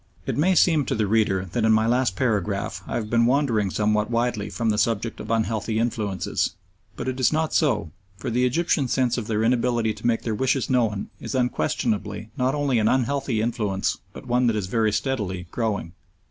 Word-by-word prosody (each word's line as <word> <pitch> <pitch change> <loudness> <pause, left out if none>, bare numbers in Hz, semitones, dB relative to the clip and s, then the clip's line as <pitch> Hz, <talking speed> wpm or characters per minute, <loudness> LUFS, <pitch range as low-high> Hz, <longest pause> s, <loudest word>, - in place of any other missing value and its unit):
It - - -2
may 180 +6 +3
seem 160 -4 +4
to 135 - -1
the 110 -2 +1
reader 100 -3 +1
that 115 +3 -1
in 110 - +4
my 110 0 +3
last 120 -4 +1
paragraph 100 -5 -1
I - - -3
have 115 -3 -2
been 115 +1 +3
wandering 120 -7 +2
somewhat 105 +2 +1
widely 115 -3 -1
from 110 +3 0
the 105 - 0
subject 115 +1 0
of - - -7
unhealthy 110 -1 0
influences, 105 -5 -1 0.4
but - - -5
it 130 0 -2
is 130 - +3
not 160 0 0
so, 120 - +1 0.3
for 110 - -4
the 125 +2 +1
Egyptians' 135 0 +1
sense 125 -2 +1
of 110 - -6
their 110 -1 0
inability 120 -1 +1
to - - -4
make 115 -1 +1
their 115 - -1
wishes 130 +3 0
known 110 -5 0
is - - -5
unquestionably 110 -4 -1
not 130 +2 +1
only 140 -5 +1
an 110 - +2
unhealthy 130 -2 +1
influence 105 -5 -1
but - - -11
one 125 0 +2
that 115 - +2
is 105 -3 -1
very 110 +3 +1
steadily 105 -5 -2
growing. 105 -8 -2
115 Hz, 200 wpm, -24 LUFS, 105-125 Hz, 0.4 s, seem